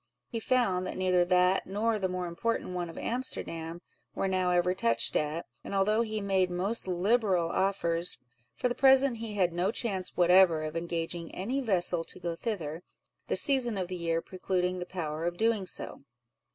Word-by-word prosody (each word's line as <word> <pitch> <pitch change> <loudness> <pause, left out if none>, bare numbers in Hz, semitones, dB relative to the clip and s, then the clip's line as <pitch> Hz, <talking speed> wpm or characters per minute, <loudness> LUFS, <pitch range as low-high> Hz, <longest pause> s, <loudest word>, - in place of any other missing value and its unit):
He 230 - -3
found, 215 -7 +1
that - - -5
neither 185 -1 +3
that 180 +1 +2
nor 215 +3 0
the 190 - 0
more 180 0 -3
important 180 +4 -2
one 175 -1 -3
of 165 - -10
Amsterdam 170 -9 -3 0.3
were 195 - 0
now 185 -1 +1
ever 180 0 +2
touched 115 -9 +2
at: 155 +2 -1 0.2
and - - -5
although 210 +3 +3
he 215 -2 -2
made 190 -2 +1
most 190 +5 0
liberal 185 -2 +1
offers, 180 -3 0 0.4
for - - 0
the 245 - -1
present 265 -1 +5
he 220 -2 -6
had 180 -4 +2
no 180 +4 0
chance 195 -6 -2
whatever 175 -2 +5
of 155 +1 -5
engaging 165 0 -3
any 245 +9 -2
vessel 180 -7 0
to - - -5
go 170 -1 -3
thither, 165 -6 -4 0.5
the - - 0
season 255 -7 +2
of 185 -2 -3
the 185 - -3
year 165 -1 -1
precluding 185 -1 -2
the 180 - -5
power 160 -4 -4
of 175 0 -2
doing 220 -3 +1
so. - - -5
185 Hz, 180 wpm, -29 LUFS, 175-210 Hz, 0.5 s, present